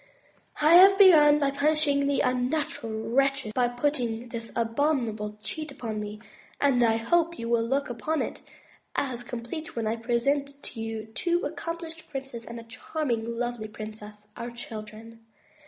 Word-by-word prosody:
I 310 +2 +6
have 390 +2 +8
begun 310 -7 +8
by 280 -2 +1
punishing 285 0 +2
the 280 - +2
unnatural 250 -4 -1
wretches 275 -2 +2
who 245 -1 +3
put 245 +4 0 0.4
this 230 -1 -6
abominable 230 -3 0
cheat 310 +6 -4
upon 225 -5 -5
me; 210 0 -6 0.4
and 265 -4 +3
I 225 -1 +4
hope 335 +9 +1
you 230 - -5
will 235 -1 +2
look 270 +5 0
upon 280 +7 -1
it - - -6 0.5
as 255 -4 -1
complete 240 +6 -6
when 230 -2 -2
I 220 +1 0
present 275 +5 0
to 225 - -6
you 225 -1 -4
two 345 +10 -1
accomplished 325 +2 -6
princes 265 -4 -6
and 235 0 -7
a - - -9
charming 235 -1 -3
lovely 240 -2 -3
princess, 210 -1 -10
our 235 - -5
children. 225 -1 -9
245 Hz, 155 wpm, -27 LUFS, 225-290 Hz, 0.5 s, have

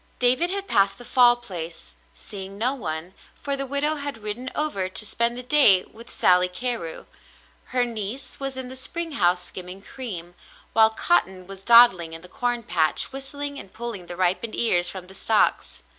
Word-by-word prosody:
David 255 +8 +2
had 395 +1 -4
passed 195 - +2
the 245 - -11
Fall 245 -1 +5
Place, 175 -8 -7 0.2
seeing 195 -1 -8
no 245 +5 +2
one; 175 - -5 0.2
for 280 -1 -1
the 275 0 -3
widow 290 +3 0
had 280 -6 -5
ridden 225 +5 -4
over 245 -12 0
to 215 +3 -4
spend 235 +3 +1
the 250 - -5
day 250 -9 +5
with 230 +2 -15
Sally 180 0 +3
Carew, 180 -3 -3 0.6
her 250 -1 0
niece 230 +2 -4
was 270 -1 -3
in 260 -1 -4
the 260 - -8
spring 330 +5 -4
house 180 -9 +2
skimming 185 +2 -7
cream, 180 -11 -6 0.4
while 220 0 +6
Cotton 190 - 0
was 195 0 -9
dawdling 195 -8 +6
in 165 +1 -6
the - - -9
corn 245 +1 -2
patch 160 - 0
whistling 285 +1 -3
and 190 - -8
pulling 225 -6 -4
the 175 - -6
ripened 185 +5 0
ears 175 -7 +2
from 190 -2 -8
the 190 - -13
stalks. 215 +2 0
225 Hz, 180 wpm, -24 LUFS, 185-260 Hz, 0.6 s, while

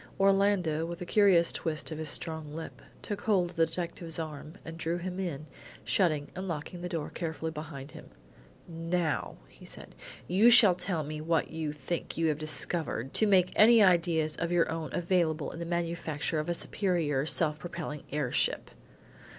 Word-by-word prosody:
Orlando, 195 -5 +3
with 170 0 -6
a - - -3
curious 185 -3 +4
twist 160 0 -3
of 155 - -5
his 155 -1 -2
strong 160 -1 -2
lip, 160 0 -8 0.2
took 205 -1 -4
hold 185 -5 +2
of - - -18
the 165 -1 +3
detective's 170 -1 -4
arm 155 0 -6
and 165 - -7
drew 165 +1 -2
him 180 +1 -5
in, 155 -6 -4 0.4
shutting 145 - +1
and 190 +1 -5
locking 170 +2 -5
the 180 - -4
door 165 -4 -4
carefully 160 -1 -4
behind 150 -3 -8
him. - - -12 0.6
"Now," 165 -1 -2 0.3
said - - -9 0.3
he, - - -6
"you 225 +4 +8
shall 225 -6 +8
tell 175 -2 -2
me 155 +1 -5
what 165 +1 0
you 160 -2 -3
think 150 +4 -5
you 165 -1 +2
have 150 -1 -1
discovered, 155 -4 -1
to 220 - +3
make 185 -3 +4
any 225 0 +7
ideas 170 -4 +3
of 170 - -2
your 175 -2 +2
own 165 -1 -4
available 170 -4 0
in 165 - -8
the 170 - -4
manufacture 165 -3 -2
of 155 - -3
a 175 - +1
superior 165 -8 0
self 155 -2 +1
propelling 170 -4 -6
air 145 -4 -1
ship." - - 0
165 Hz, 180 wpm, -30 LUFS, 155-180 Hz, 0.6 s, you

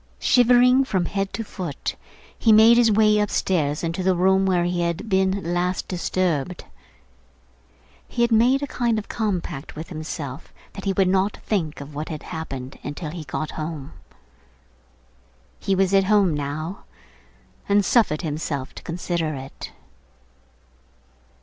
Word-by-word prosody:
Shivering 250 +1 +5
from 190 -8 0
head 195 +1 -2
to 225 - -3
foot, 180 -9 -5 0.4
he 225 - +3
made 220 +2 +8
his 235 -2 +5
way 215 0 +4
upstairs 170 -7 0
into 165 +2 -2
the 185 0 +2
room 190 +2 +3
where 180 -2 +2
he 175 0 -1
had 170 +5 -2
been 190 -3 +1
last 180 +1 -1
disturbed. 180 -2 -1 1.4
He 235 - 0
had 235 - +2
made 245 +5 +4
a - - +1
kind 240 -4 0
of 215 - -4
compact 185 -9 -3
with 160 +2 -7
himself 155 -5 -6 0.2
that 195 - -8
he 195 - +1
would 190 0 +2
not 190 +2 +1
think 160 -9 -1
of 140 +1 -9
what 150 +2 -5
had 155 -3 -6
happened 135 -6 -7
until 150 +2 -5
he 165 -2 -7
got 155 +3 -4
home. 155 -2 -6 1.7
He 195 - 0
was 190 0 +2
at 195 -1 +4
home 200 -4 +3
now, 150 +5 -4 0.8
and 200 0 +4
suffered 190 -9 +2
himself 150 -3 -3
to - - -10
consider 170 -2 -2
it. 135 0 -8
180 Hz, 145 wpm, -23 LUFS, 155-205 Hz, 1.7 s, made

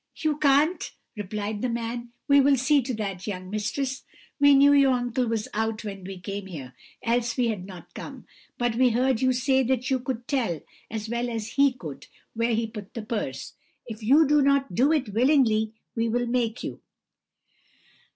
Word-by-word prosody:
"'You 310 -2 -1
can't?' 295 +4 +2 0.2
replied 210 +1 -4
the 255 - 0
man; 235 +1 -4 0.2
'we 280 0 +6
will 275 0 +4
see 270 +3 +3
to 255 +1 -4
that, 195 -3 -4
young 185 -2 -5
mistress; 255 +5 -2 0.4
we 285 0 +7
knew 285 +1 +6
your 275 -2 +5
uncle 245 0 0
was 225 -2 -1
out 220 +1 -1
when 195 -3 -6
we 195 0 -7
came 200 +1 -6
here, 140 -8 -8 0.3
else 235 0 0
we 245 -2 +2
had 195 -4 -4
not 175 -2 -12
come; 270 -4 -9 0.3
but 240 -1 0
we 250 +2 +4
heard 250 +1 +1
you 260 0 +3
say 260 +1 +2
that 260 0 0
you 260 - +2
could 245 -1 -5
tell, 235 - 0 0.3
as 220 0 -4
well 235 +2 -2
as 225 -2 -4
he 280 0 +4
could, 165 - -9 0.3
where 230 0 +1
he 230 +1 0
put 215 -3 -9
the 230 - -4
purse; 210 - -4 0.3
if 220 -1 -8
you 280 +9 +5
do 295 0 +4
not 275 -4 +2
do 265 - +3
it 290 -8 +1
willingly, 230 -3 +3 0.2
we 230 0 0
will 245 +2 0
make 235 -1 -1
you.' - - -6
235 Hz, 190 wpm, -26 LUFS, 215-265 Hz, 0.4 s, we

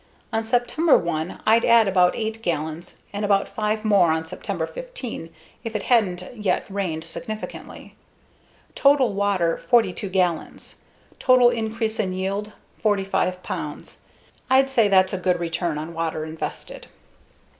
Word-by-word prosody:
On 225 0 0
September 245 +8 +3
1 165 0 -3
I'd 225 +2 +4
add 230 -2 +5
about 180 -2 +3
8 220 0 -3
gallons 165 -1 -4
and 205 +1 -3
about 200 -1 +2
5 215 0 -2
more 200 -5 +4
on 160 0 -1
September 160 - -4
15 385 - -7 0.3
if 225 -2 -6
it 215 - -2
hadn't 195 -7 +2
yet 210 -5 -1
rained 180 -5 -2
significantly. 215 +6 -8 0.8
Total 275 -6 +4
water: 195 -4 +1
42 210 -5 +1
gallons. 180 -3 -2 0.4
Total 255 -2 +5
increase 225 -1 -2
in 190 -4 0
yield: 195 +3 -3 0.3
45 195 -3 0
pounds. - - -6 0.5
I'd 270 +1 +4
say 230 -5 +4
that's 190 -1 +4
a 190 - -1
good 180 -1 +1
return 170 -1 -2
on 155 +2 -6
water 160 -1 -2
invested. 160 - -7
200 Hz, 135 wpm, -23 LUFS, 175-225 Hz, 0.8 s, add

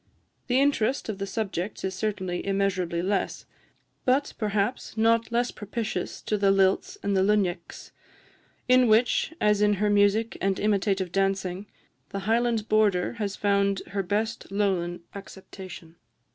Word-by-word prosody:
The 255 +1 +3
interest 275 -3 +1
of 205 -2 -4
the 195 - -3
subjects 195 -2 -3
is 190 - -2
certainly 190 -3 -3
immeasurably 185 -3 0
less; 195 +1 -1 0.6
but, 265 +3 +1
perhaps, 215 +2 -1
not 230 +1 +2
less 240 +1 +1
propitious 215 +2 -4
to 210 - -1
the 200 0 +3
lilts 195 - +2
and 200 - 0
the 190 - +3
luinneags, 190 -4 -1 0.8
in 255 0 +5
which, 225 +7 +3
as 210 -1 +3
in 210 0 +4
her 205 +1 +1
music 205 +2 +2
and 195 -1 0
imitative 195 -3 0
dancing, 195 0 -1 0.4
the 195 - -4
Highland 225 +1 +1
border 210 -4 +2
has 200 -1 -2
found 200 -1 +1
her 200 0 -1
best 205 +3 -2
Lowland 185 -4 -1
acceptation. 190 -4 -10
200 Hz, 140 wpm, -26 LUFS, 190-220 Hz, 0.8 s, in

